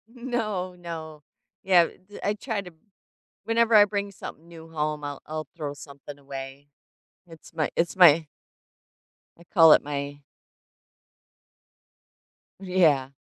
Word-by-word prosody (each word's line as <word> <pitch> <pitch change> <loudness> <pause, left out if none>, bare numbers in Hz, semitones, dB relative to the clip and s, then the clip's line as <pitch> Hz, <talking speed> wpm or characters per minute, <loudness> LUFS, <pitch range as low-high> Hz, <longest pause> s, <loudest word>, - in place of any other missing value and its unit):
No, 215 -7 -3
no. 160 -3 -8 0.4
Yeah, 180 -3 +5
th 200 +3 -15
I 205 - +1
try 215 0 -4
to 180 -2 -11 0.7
whenever 230 +1 +2
I 210 -1 +9
bring 200 0 -3
something 170 -3 -10
new 165 -1 -13
home, 150 -1 -3
I'll 145 -1 -6
I'll 155 -2 -5
throw 150 -3 -4
something 140 0 -12
away. 135 0 -9 0.6
It's 165 -2 -15
my 155 -2 -1
it's 170 +3 0
my 165 -3 +7 1.1
I 170 - -17
call 165 -3 +6
it - - +3
my 145 0 -5 2.4
Yeah. 170 -8 +2
165 Hz, 120 wpm, -25 LUFS, 145-190 Hz, 2.4 s, I